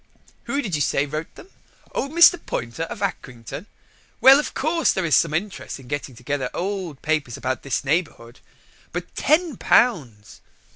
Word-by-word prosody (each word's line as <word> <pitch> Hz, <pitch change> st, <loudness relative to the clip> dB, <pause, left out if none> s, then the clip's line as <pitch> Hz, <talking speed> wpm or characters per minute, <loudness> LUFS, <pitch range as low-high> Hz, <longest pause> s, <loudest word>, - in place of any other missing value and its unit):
Who 285 Hz, +1 st, -1 dB
did 195 Hz, -, -5 dB
you 150 Hz, -, 0 dB
say 140 Hz, +2 st, +1 dB
wrote 155 Hz, +2 st, -6 dB
them? 380 Hz, -, -14 dB, 0.4 s
Old 275 Hz, -, -2 dB
Mr. 340 Hz, +1 st, +6 dB
Poynter, 120 Hz, +7 st, -4 dB
of 200 Hz, +4 st, -7 dB
Acrington? 140 Hz, -, -5 dB, 0.5 s
Well, 270 Hz, +2 st, +8 dB
of 300 Hz, -, -4 dB
course, 325 Hz, +3 st, +1 dB
there 190 Hz, -, -1 dB
is 155 Hz, -, +3 dB
some 165 Hz, -, +3 dB
interest 175 Hz, -1 st, -4 dB
in 130 Hz, -, -14 dB
getting 135 Hz, -2 st, -4 dB
together 130 Hz, +1 st, -3 dB
old 185 Hz, -6 st, -4 dB
papers 150 Hz, -6 st, -1 dB
about 130 Hz, -2 st, -3 dB
this 135 Hz, -, -2 dB
neighbourhood. 140 Hz, -6 st, -2 dB, 0.5 s
But -, -, -5 dB
Ten 315 Hz, -, +1 dB
Pounds!" 130 Hz, -, +1 dB
155 Hz, 160 wpm, -23 LUFS, 130-215 Hz, 0.5 s, Well